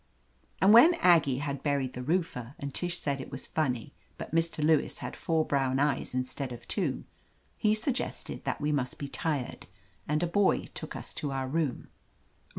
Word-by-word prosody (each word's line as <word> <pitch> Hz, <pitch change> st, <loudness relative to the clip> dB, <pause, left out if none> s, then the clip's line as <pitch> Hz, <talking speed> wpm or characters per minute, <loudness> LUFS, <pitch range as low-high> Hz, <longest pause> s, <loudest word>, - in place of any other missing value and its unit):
And 195 Hz, +3 st, +6 dB
when 315 Hz, +10 st, +9 dB
Aggie 165 Hz, -, +4 dB
had 140 Hz, -2 st, -3 dB
buried 140 Hz, -3 st, 0 dB
the 125 Hz, -, -5 dB
roofer, 140 Hz, -4 st, -2 dB
and 140 Hz, -1 st, -5 dB
Tish 175 Hz, -1 st, 0 dB
said 140 Hz, -2 st, -2 dB
it -, -, -8 dB
was 135 Hz, -, -4 dB
funny, 125 Hz, -7 st, -2 dB, 0.2 s
but -, -, -7 dB
Mr. 165 Hz, -2 st, +1 dB
Lewis 155 Hz, 0 st, +2 dB
had -, -, -6 dB
four 160 Hz, -1 st, 0 dB
brown 135 Hz, -2 st, +1 dB
eyes 140 Hz, -2 st, 0 dB
instead 130 Hz, +1 st, -2 dB
of 120 Hz, -1 st, -9 dB
two, -, -, -1 dB, 0.5 s
he 215 Hz, 0 st, +2 dB
suggested 245 Hz, +4 st, -3 dB
that -, -, -2 dB
we 150 Hz, 0 st, 0 dB
must 130 Hz, -4 st, -1 dB
be 140 Hz, -, -5 dB
tired, 140 Hz, -2 st, -3 dB, 0.4 s
and 150 Hz, +3 st, +1 dB
a -, -, +3 dB
boy 195 Hz, +3 st, +2 dB
took -, -, -6 dB
us -, -, -6 dB
to 145 Hz, -, -4 dB
our 135 Hz, -1 st, -2 dB
room. 150 Hz, -2 st, -2 dB
145 Hz, 180 wpm, -29 LUFS, 135-165 Hz, 0.5 s, when